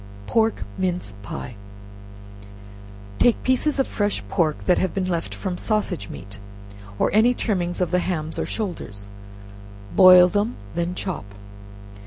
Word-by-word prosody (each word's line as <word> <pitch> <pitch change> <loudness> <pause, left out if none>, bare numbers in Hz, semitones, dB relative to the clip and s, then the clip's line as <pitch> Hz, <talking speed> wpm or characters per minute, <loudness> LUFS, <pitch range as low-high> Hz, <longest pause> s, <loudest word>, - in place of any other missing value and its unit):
Pork 225 - +1 0.2
Mince 180 - -2
Pies. 115 +4 -7 1.7
Take 240 - +3
pieces 260 +4 +1
of 270 - +2
fresh 205 -1 -1
pork 155 -5 0
that 180 - +3
have 185 -3 -1
been 190 -1 0
left 170 -2 -2
from 185 -3 -4
sausage 210 - -1
meat, 100 +1 -10 0.6
or - - +1
any 230 +4 +4
trimmings 180 -6 -1
of 180 - 0
the 180 - +3
hams 160 -3 -3
or - - -2
shoulders; 105 - -5 0.9
boil 180 -1 +9
them, 205 +5 0 0.2
then 170 +1 -2
chop. 185 - -4
180 Hz, 135 wpm, -23 LUFS, 165-210 Hz, 1.7 s, boil